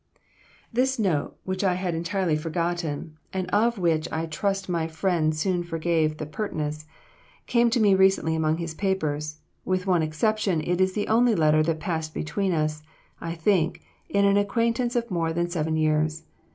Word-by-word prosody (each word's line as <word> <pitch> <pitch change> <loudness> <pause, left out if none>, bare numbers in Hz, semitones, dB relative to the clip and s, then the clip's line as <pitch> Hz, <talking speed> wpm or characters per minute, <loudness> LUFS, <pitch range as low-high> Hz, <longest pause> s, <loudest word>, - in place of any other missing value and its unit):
This 260 +3 +2
note, 180 -10 0
which 185 +1 -3
I 185 -2 +2
had 180 -1 -2
entirely 170 0 0
forgotten, 165 -1 -3
and 185 -1 -2
of 230 +3 +2
which 165 -4 0
I 160 +1 -1
trust 195 +5 -2
my 170 -3 -1
friend 160 -2 0
soon 180 +2 0
forgave 165 -2 0
the 155 - -4
pertness, 155 -3 -4 0.6
came 235 -1 +3
to 235 - +1
me 205 -3 +5
recently 190 -4 +3
among 160 0 +1
his 165 -1 -4
papers; 155 -5 -1 0.3
with 185 0 -1
one 180 -3 +3
exception, 185 +3 0
it 175 +4 0
is 185 0 +2
the 205 0 -2
only 230 +1 +4
letter 155 -2 +4
that 160 0 0
passed 160 -3 -3
between 185 +6 -1
us, 155 -2 -1 0.4
I 165 0 -4
think, 165 -1 +1 0.3
in 200 0 +3
an 200 0 +4
acquaintance 230 +4 +1
of 235 -2 -1
more 165 -2 0
than 175 +1 -1
seven 160 -2 -1
years. 155 0 +1
170 Hz, 170 wpm, -25 LUFS, 155-195 Hz, 0.6 s, me